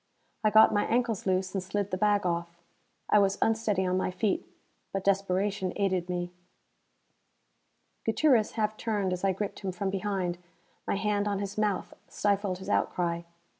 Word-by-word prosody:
I 215 - +5
got 220 +1 +7
my 205 - +2
ankles 235 -4 0
loose 185 0 +1
and 195 - -1
slid 200 +2 -3
the - - +1
bag 205 0 +2
off. 170 0 -2 0.5
I 210 - +5
was 195 -1 +2
unsteady 220 -4 +1
on 185 0 +1
my 185 - 0
feet, 190 +2 -1 0.4
but 195 -1 -2
desperation 195 0 0
aided 185 -3 0
me. 175 0 -2 1.7
Gutierrez 230 -1 +3
half 215 -1 -1
turned 205 -5 -1
as 180 - -5
I 195 - +3
gripped 195 +2 -4
him 195 -2 -3
from 190 +2 -2
behind. 190 -3 -2 0.5
My - - +1
hand 205 0 0
on 200 -1 0
his 200 0 -4
mouth 210 -3 -1
stifled 200 -2 0
his 190 +1 -10
outcry. 170 -4 0
195 Hz, 165 wpm, -29 LUFS, 185-210 Hz, 1.7 s, got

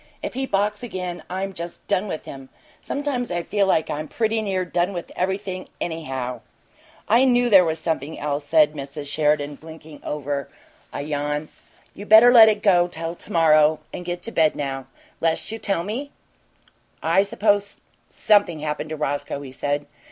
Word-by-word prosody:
If - - -4
he 265 +1 -2
balks 205 0 0
again 185 -6 -5
I'm 190 +2 -3
just 170 -1 -7
done 200 0 +1
with 160 - -5
him! 135 -1 -10 0.3
Sometimes 275 -4 -2
I 175 -1 -2
feel 200 +1 +1
like 160 -4 +1
I 150 - -2
was 155 - -9
pretty 225 -1 0
near 190 -3 -1
done 175 +2 0
with 175 -2 -6
everything, 190 0 -3
anyhow!" 130 -7 -4 0.7
"I 235 +4 +5
knew 245 -2 +3
there 190 -3 +8
was 160 -2 -1
something 160 -2 -3
else," 145 0 -2
said 155 -1 +4
Mrs. 145 0 -7
Sheridan, 150 -1 0
blinking 160 -1 -12
over 140 -2 -3 0.4
a - - -4
yawn. 150 +1 -2 0.4
"You 205 - -10
better 225 +3 +8
let 225 -2 +9
it 210 -1 -1
go 175 -4 +4
till 165 -1 -5
to - - -10
morrow 155 -2 +4
and - - -6
get 175 0 -5
to 230 - -3
bed 160 -6 +3
now 135 -2 -4 0.3
'less 165 +4 -1
you'll 225 - -6
tell 195 -5 0
me?" 240 +9 -4 1.1
"Suppose 205 0 0 0.3
something 205 -7 +2
happened 150 0 -3
to 155 - -3
Roscoe," 145 -1 -3
he 135 -2 -9
said. 145 +2 -2
170 Hz, 175 wpm, -23 LUFS, 150-205 Hz, 1.1 s, let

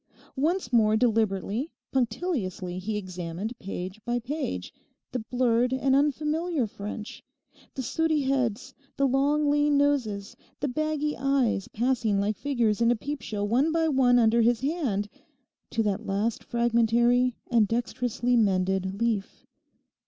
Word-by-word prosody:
Once 305 -1 0
more, 215 -2 +4
deliberately, 220 - 0 0.2
punctiliously, 225 - -2
he 210 +3 -3
examined 185 +2 -5
page 190 +1 -6
by 240 0 -1
page 245 - -4 0.4
the 250 - -2
blurred 245 +1 +1
and 265 0 +2
unfamiliar 300 +1 +1
French—the 210 +5 -9
sooty 315 +3 +1
heads, 260 -2 -1 0.2
the 275 - +3
long, 285 +3 +2
lean 290 0 +3
noses, 245 -9 0 0.2
the 285 - -1
baggy 300 +2 -1
eyes 265 -7 +1
passing 230 -3 0
like 205 +2 0
figures 235 -6 0
in 230 - +4
a 240 - +4
peepshow 225 -5 -4
one 260 +9 +2
by 325 0 +2
one 260 -4 +4
under 235 0 +4
his 235 +1 +2
hand—to 265 - -4
the 205 -1 0
last 215 +1 -2
fragmentary 235 +1 +2 0.2
and 225 -3 +4
dexterously 245 +1 -1
mended 190 -2 +1
leaf. 225 -4 -2
240 Hz, 125 wpm, -27 LUFS, 210-275 Hz, 0.4 s, more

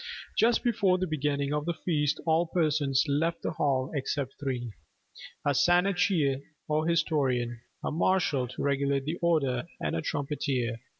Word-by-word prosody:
Just 235 +1 +3
before 205 -6 +2
the 185 - -1
beginning 145 -3 -1
of 150 +1 -2
the 170 - 0
feast 150 -5 0
all 165 +1 +2
persons 150 -5 +1
left 160 +4 0
the - - -1
hall 135 -4 0
except 140 -1 -2
three: 125 -5 -3 0.7
A 145 - +3
Shanachie 175 -2 +2 0.3
or 155 +1 0
historian: 130 -8 +1 0.2
a - - -1
marshal 155 -5 +1
to 130 - -6
regulate 140 -1 +1
the 160 +4 -3
order: 150 -6 +1
and - - -2
a - - -1
trumpeter. 135 -5 -2
150 Hz, 145 wpm, -29 LUFS, 135-170 Hz, 0.7 s, Just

